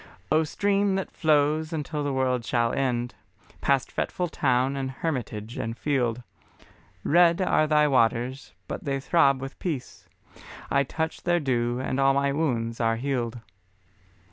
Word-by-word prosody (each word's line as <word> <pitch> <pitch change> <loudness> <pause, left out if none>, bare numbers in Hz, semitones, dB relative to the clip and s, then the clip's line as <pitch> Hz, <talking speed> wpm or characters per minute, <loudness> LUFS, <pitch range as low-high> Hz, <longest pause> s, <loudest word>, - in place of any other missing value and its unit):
O 155 +1 +4
Stream 200 +4 +1
that 190 - -3
flows 155 0 +2
until 150 -1 -3
the 145 - -1
world 130 -2 0
shall 120 0 0
end, 120 -3 -1 0.5
Past 140 -2 +1
fretful 180 -1 -2
town 130 -2 +1
and 135 -1 -2
hermitage 120 -6 -4
and 115 +1 -4
field, 125 -5 0 0.8
Red 170 +2 +4
are 155 -4 +2
thy 150 -1 +4
waters, 125 0 +1
but - - -5
they 135 -1 -1
throb 140 -2 +3
with 135 +1 -7
peace; 150 -8 -5 0.6
I 140 - +4
touch 160 +4 -3
their 175 0 +2
dew 120 -4 0
and 130 0 -2
all 135 0 +4
my 140 0 +2
wounds 120 -6 -1
are 115 0 +2
healed. 120 -2 -2
135 Hz, 145 wpm, -26 LUFS, 125-155 Hz, 0.8 s, O